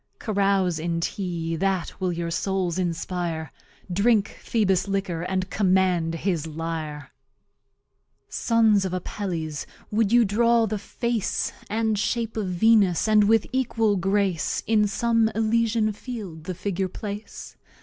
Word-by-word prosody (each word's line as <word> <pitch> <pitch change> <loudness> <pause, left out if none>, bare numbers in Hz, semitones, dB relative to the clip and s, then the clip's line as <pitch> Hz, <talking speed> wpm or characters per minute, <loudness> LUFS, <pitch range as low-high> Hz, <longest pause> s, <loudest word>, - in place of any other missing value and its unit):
Carouse 195 -5 +1
in 165 +1 -1
Tea, 170 -2 -3
that 190 0 -1
will 185 -1 +1
your 170 0 -3
Souls 185 -1 -1
inspire; 170 -2 -3 0.4
Drink 205 +2 +3
Phoebus's 195 -4 +1
liquor 195 -4 -2
and 185 +1 -2
command 185 -4 +2
his 165 -2 -1
Lyre. 155 -2 -5 1.2
Sons 225 -4 +3
of 190 -1 -3
Appelles, 175 -5 -4 0.2
wou'd 215 -1 +2
you 240 -1 +6
draw 230 +3 +3
the 215 -1 -2
Face 235 +1 -2 0.2
And 220 -1 0
Shape 230 +1 -1
of 215 -3 -2
Venus, 195 0 +3
and 215 -1 +5
with 225 0 +4
equal 225 -5 +1
Grace 195 -2 0
In 210 -1 +3
some 230 +2 +2
Elysian 225 0 +1
Field 200 -9 -7
the 185 -1 -4
Figure 190 0 -2
place? 205 +3 -7
195 Hz, 130 wpm, -25 LUFS, 175-220 Hz, 1.2 s, you